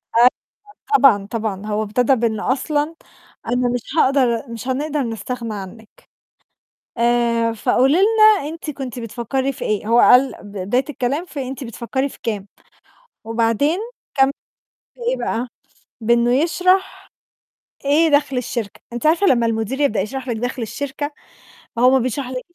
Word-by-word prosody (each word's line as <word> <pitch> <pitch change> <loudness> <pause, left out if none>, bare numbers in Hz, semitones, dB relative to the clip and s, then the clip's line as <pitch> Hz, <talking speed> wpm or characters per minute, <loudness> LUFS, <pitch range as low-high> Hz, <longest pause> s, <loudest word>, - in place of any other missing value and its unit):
أ" - - +5
آه 245 - +9 0.7
طبعًا، 215 - +4
طبعًا، 210 -2 -4
هو 215 0 -1
ابتدا 240 +5 +2
بإن 225 -3 -1
أصلًا: 295 +4 -1 0.5
"أنا 245 +1 +1
مش 245 - -2 0.2
هاقدر 260 -5 +3
مش 230 +3 -7
هنقدر 290 +2 -1
نستغنى 230 0 -4
عنِّك، 210 +2 -9 1.1
آآ، 235 -1 +2
فقولي 260 +6 +2
لنا 430 -3 +5
أنتِ 325 -1 -7
كنتِ 260 -3 -6
بتفكّري 240 +4 -2
في - - -6
إيه؟" 210 0 -1
هو 235 +1 +4
قال 260 +2 +6
ب 205 - -11
بداية 205 +8 0
الكلام 280 +4 -2
في 280 -6 -6
"أنتِ 265 +1 -6
بتفكّري 260 +4 -3
في - - -14
كام؟" 210 -4 -3 0.8
وبعدين 230 - +1 0.4
كان 270 0 +4 0.6
في - - -25
إيه - - -1
بقى، 235 +3 -2 0.5
بإنّه 235 +2 +3
يشرح 365 +6 +1 0.8
إيه 310 +4 +4
دَخْل 285 -2 +2
الشركة. 235 -4 -4
أنِت 240 +6 -2
عارفة 335 +5 +3
لمّا 235 -8 +3
المدير 225 +4 -2
يبدأ 225 -8 +2
يشرح 255 +6 -5
لِك 235 - -1
دَخْل 245 +2 -3
الشركة، 285 +5 -4 0.6
فهو 245 +2 +5
ما 265 - +4
بيشرحلِكش 255 +1 -3
250 Hz, 145 wpm, -20 LUFS, 230-280 Hz, 1.1 s, آه